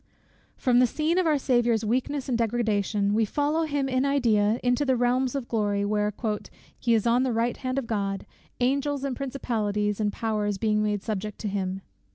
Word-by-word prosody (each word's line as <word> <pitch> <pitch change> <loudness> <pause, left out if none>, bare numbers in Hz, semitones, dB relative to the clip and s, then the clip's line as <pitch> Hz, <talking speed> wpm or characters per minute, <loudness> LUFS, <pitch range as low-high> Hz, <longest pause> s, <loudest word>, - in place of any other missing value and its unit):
From 245 -1 +3
the 250 - +5
scene 315 +8 0
of 365 - +2
our 305 -2 +3
Saviour's 240 -4 +2
weakness 260 +5 -1
and 255 - 0
degradation, 215 -3 0
we 225 +1 +3
follow 295 +8 0
him, 285 -3 -1
in 255 0 +1
idea, 230 -6 +2
into 245 +3 +2
the 265 -2 +2
realms 250 +2 +1
of 265 -4 -3
glory, 205 -3 0
where 210 0 0 0.7
"he 235 -1 +2
is 220 - +1
on 235 +1 +3
the 260 -1 +1
right 230 +1 0
hand 255 0 -3
of 270 - -1
God; 200 -3 -2 0.3
angels, 280 +2 0
and 275 -2 -2
principalities, 215 -7 -2
and 210 -1 +1
powers 210 -2 -1
being 210 +1 +1
made 210 -2 -1
subject 210 0 -4
unto 200 - -2
him." 190 -1 -2
235 Hz, 190 wpm, -26 LUFS, 210-265 Hz, 0.7 s, the